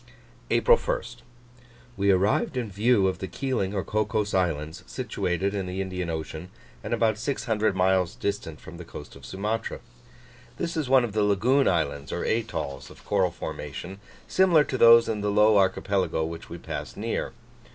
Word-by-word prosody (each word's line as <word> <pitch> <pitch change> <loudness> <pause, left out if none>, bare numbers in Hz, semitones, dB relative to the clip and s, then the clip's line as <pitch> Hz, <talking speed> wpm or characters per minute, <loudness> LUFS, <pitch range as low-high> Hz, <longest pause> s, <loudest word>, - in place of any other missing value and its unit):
APRIL 485 0 +5
1st. - - -3 0.8
We 100 -1 +1
arrived 100 +6 +2
in 115 -5 -3
view 105 0 +3
of 95 - -2
the 95 - -4
Keeling 105 -2 -2
or 95 - -1
Cocos 105 0 -1
Islands, 80 -3 -1
situated 100 -6 -2
in 95 -2 -3
the 90 +1 -4
Indian 90 -2 -3
Ocean, 80 +1 -5 0.3
and - - -6
about 110 -2 +1
six 120 -1 -2
hundred 110 -3 +1
miles 95 -2 +2
distant 80 -6 -4
from - - -11
the - - -8
coast - - -10
of 70 -3 -12
Sumatra. 105 - -3 0.8
This 170 -1 -3
is 155 -5 -2
one 130 -1 +6
of 115 -4 -3
the 110 - +1
lagoon 115 +8 +3
islands 70 -5 0
(or - - -2
atolls) 105 - -2
of - - -16
coral - - +2
formation, 95 +2 -7 0.3
similar 180 -5 +4
to 130 - -3
those 115 0 +8
in 105 -2 -2
the 105 - 0
Low 105 0 +5
Archipelago 95 -3 +1
which 80 +1 -7
we 85 - -7
passed - - -6
near. - - -2
100 Hz, 170 wpm, -26 LUFS, 90-115 Hz, 0.8 s, those